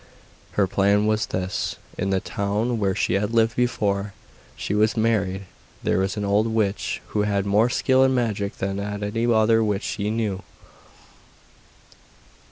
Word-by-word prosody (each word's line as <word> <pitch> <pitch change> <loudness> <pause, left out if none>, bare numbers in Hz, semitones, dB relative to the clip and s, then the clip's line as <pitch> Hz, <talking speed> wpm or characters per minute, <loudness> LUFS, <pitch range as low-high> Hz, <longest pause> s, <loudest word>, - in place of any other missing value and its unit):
Her 100 - +3
plan 100 +2 +2
was 110 0 +1
this. 95 0 -2 0.2
In 95 - -2
the 95 -1 +2
town 105 +5 -1
where 95 -2 +1
she - - 0
had 105 +4 0
lived 115 +1 +3
before 105 -5 0 0.4
she - - -3
was 110 +2 +2
married 100 -4 +1 0.4
there - - +1
was 95 +3 -1
an 105 - -1
old 105 +3 +2
witch, 110 -3 -1
who 105 - 0
had 100 -1 0
more 105 +4 +3
skill 130 +1 +3
in 135 - +4
magic 105 -5 -1
that 95 +1 -2
any 105 +3 -1
other 110 0 +4
witch 105 -2 -1
she 105 0 -2
knew. 105 -4 -1
105 Hz, 155 wpm, -23 LUFS, 100-110 Hz, 0.4 s, in